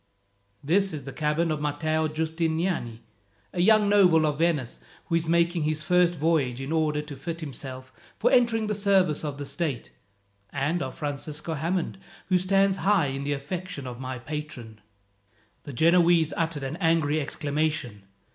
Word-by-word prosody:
"This 190 +5 +2
is 150 -3 -5
the 135 - -8
cabin 155 +2 0
of 150 -1 -2
Matteo 155 +2 0
Giustiniani, 160 -5 -2 0.5
a 175 - 0
young 215 +2 +5
noble 180 -6 +5
of 150 -1 -1
Venice, 155 -8 0 0.3
who - - -5
is 165 -1 +1
making 170 0 +2
his 155 0 -1
first 175 +1 +3
voyage, 145 -6 +1
in 135 +3 -5
order 155 -2 +1
to 150 -1 -9
fit 165 +5 -6
himself 130 -2 -8 0.2
for - - +2
entering 230 -3 +3
the 210 - -1
service 195 -7 +2
of 145 -2 -4
the 145 - -5
state: 140 -2 -3 0.6
and 145 +7 -1
of 130 -2 -5
Francisco 150 +2 -4
Hammond, 170 +5 -2 0.3
who 185 -1 +4
stands 195 +1 +2
high 190 -9 +2
in 135 +1 -4
the 145 - 0
affections 155 +1 -5
of 125 -1 -7
my 130 -1 -5
patron." 120 -5 -7 0.8
The 145 - -7
Genoese 170 +2 +4
uttered 165 -4 -1
an 135 +4 -4
angry 160 -2 +2
exclamation. 145 -8 -2
155 Hz, 160 wpm, -26 LUFS, 140-170 Hz, 0.8 s, young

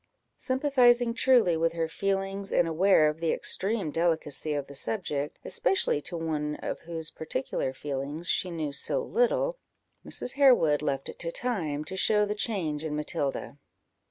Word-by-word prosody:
Sympathizing 250 -3 +3
truly 235 -8 +4
with 165 +1 +1
her 165 -1 -1
feelings, 195 +3 -2
and 175 - +3
aware 165 -1 +4
of 150 +1 -2
the 165 -1 0
extreme 195 -5 0
delicacy 160 -2 0
of 145 -1 -2
the 140 - -12
subject, 150 -4 -3
especially 385 - +1
to 170 - -3
one 150 -2 -2
of - - -5
whose 165 -1 -6
peculiar 135 -4 -3
feelings 145 +4 -4
she 185 - +1
knew 160 -4 -3
so 140 - 0
little, - - +1 0.4
Mrs. 250 - -3
Harewood 245 - +4
left 140 -2 -2
it - - -9
to 170 -1 -2
time 170 -11 -2
to 190 - -6
show 210 +2 +3
the 205 - -2
change 180 -9 -2
in 155 -2 -3
Matilda. 150 -2 -3
165 Hz, 155 wpm, -28 LUFS, 150-210 Hz, 0.4 s, truly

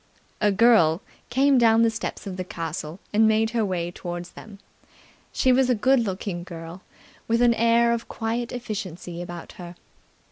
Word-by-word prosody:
A 210 -1 +3
girl 195 -5 +4 0.3
came 270 +1 +3
down 230 -1 +5
the 230 - +3
steps 220 -1 -5
of 195 -2 -5
the 185 - -4
castle 165 -1 -6
and 220 +1 +5
made 220 +1 +2
her 235 -2 0
way 175 -3 -2
towards 175 0 -7
them. 210 -2 -12 0.7
She 260 - +2
was 255 0 +3
a 250 - +3
good 260 +5 +3
looking 190 -4 -3
girl, 170 0 -9 0.5
with 230 +1 +2
an 240 -1 +5
air 235 +1 +3
of 235 0 -4
quiet 230 +1 -3
efficiency 190 -7 -6
about 175 -1 -8
her. 175 0 -9
215 Hz, 170 wpm, -24 LUFS, 175-235 Hz, 0.7 s, down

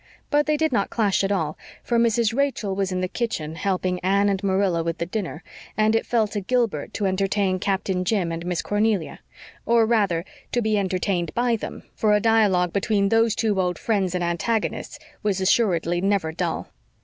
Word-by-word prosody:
But 295 0 +3
they 305 0 +2
did 315 +1 +1
not 200 -5 +1
clash 205 -4 +1
at 195 - 0
all, 160 -6 -1 0.2
for 235 -1 +1
Mrs. 230 -1 +2
Rachel 270 -8 0
was 195 0 -1
in 185 0 -1
the 185 - 0
kitchen 180 -8 -3
helping 185 0 -1
Anne 200 +2 +2
and 195 0 -1
Marilla 190 -3 +1
with 165 0 -2
the 170 - -2
dinner, 180 -3 -4 0.3
and 215 +1 +3
it 225 - 0
fell 225 -3 +2
to 205 -1 -3
Gilbert 225 - -1
to 205 - -1
entertain 190 0 0
Captain 190 -1 -1
Jim 185 -3 0
and 165 0 -4
Miss 175 -1 -2
Cornelia, 205 -4 0 0.4
or 230 -1 +4
rather 200 -7 +1 0.3
to 245 - +2
be 220 -2 +1
entertained 185 -3 -1
by 240 0 +2
them, 220 - -7
for 210 -1 +2
a - - +3
dialogue 205 -6 +3
between 200 0 +1
those 225 0 +3
two 210 -4 +1
old 180 -2 -1
friends 195 -5 0
and 180 - -1
antagonists 175 +6 -2 0.2
was 205 -3 0
assuredly 175 -4 +2
never 195 -4 +1
dull. 165 0 -3
200 Hz, 190 wpm, -23 LUFS, 180-220 Hz, 0.4 s, or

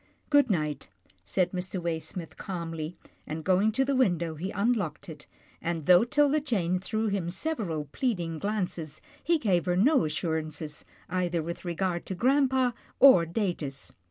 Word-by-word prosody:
" - - -38
Good 285 -3 +5
night," 150 -7 -1 0.4
said 180 - 0
Mr. 185 0 -3
Waysmith, 170 0 -4
calmly, 165 -3 -5 0.3
and, 155 +1 -5
going 190 +5 +3
to 270 +4 +2
the 275 0 0
window, 175 -10 +2
he 170 +5 -4
unlocked 200 -8 -1
it, 150 -2 -10 0.3
and, 165 -2 -2
though 180 +5 +7
'Tilda 290 +4 +3
Jane 190 - 0
threw 220 +3 -1
him 195 -4 -1
several 185 - -3
pleading 175 -11 -1
glances, 180 -7 -3 0.2
he 335 0 +3
gave 190 - +1
her 180 - +2
no 245 - +4
assurances, 155 -1 -3 0.2
either 175 -2 -1
with 170 +3 -6
regard 175 0 -2
to 190 - -3
grampa 260 +2 +3 0.3
or 220 -12 +8
Datus. 165 -8 -3
180 Hz, 155 wpm, -28 LUFS, 165-220 Hz, 0.4 s, or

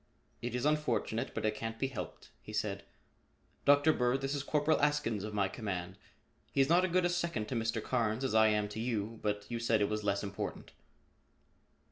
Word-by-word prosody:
"It 120 0 -3
is 125 - -1
unfortunate 135 -5 0
but - - -2
it 110 - +2
can't 115 +1 -5
be 135 - 0
helped," 130 -4 -6
he - - -10
said. - - -2 0.8
"Dr. 145 +2 +6
Bird, 125 +1 +1
this 135 +1 -1
is 145 - -1
Corporal 150 +2 +2
Askins 145 -8 +1
of 105 0 -5
my 100 -2 +2
command. 95 -4 -4 0.6
He - - -1
is 135 +1 +4
not 175 +2 +5
as 185 - +1
good 180 0 +3
a - - +3
second 170 -11 -1
to - - -2
Mr. 115 -1 -1
Carnes 115 -1 0
as 130 - 0
I 110 0 +6
am 105 -1 +2
to 105 - -6
you 115 -1 -2
but 105 -1 -1
you 120 -1 -3
said 115 -1 +2
it 100 - +2
was 105 0 -2
less 100 0 0
important." 100 -1 -5
115 Hz, 205 wpm, -33 LUFS, 105-140 Hz, 0.8 s, Dr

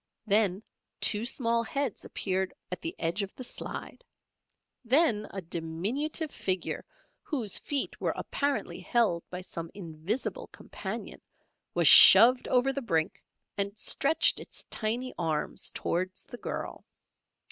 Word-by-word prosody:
Then 205 -2 +2 0.4
two 215 +1 +2
small 235 -2 +1
heads 265 +1 -3
appeared 190 -1 -2 0.2
at 180 - -5
the 165 - -5
edge 170 +5 -1
of 195 -1 -6
the 255 - -8
slide; 370 - -7 0.8
then 240 -4 +3
a 195 -1 -7
diminutive 200 - -2
figure 185 -2 -2 0.4
whose 245 - 0
feet 285 -2 -2
were - - -1
apparently 285 -1 -3
held 220 -9 +1
by 180 0 -6
some 165 -2 -7
invisible 175 +5 -4
companion, - - -8 0.5
was - - +4
shoved 250 +2 +9
over 255 +2 +2
the 275 - -3
brink 165 -9 -1 0.4
and 200 +1 -1
stretched 285 +7 +3
its - - -8
tiny 240 +4 -1
arms 160 -3 -1
towards 185 +2 -3
the 245 - -10
girl. - - -6
215 Hz, 125 wpm, -29 LUFS, 180-255 Hz, 0.8 s, shoved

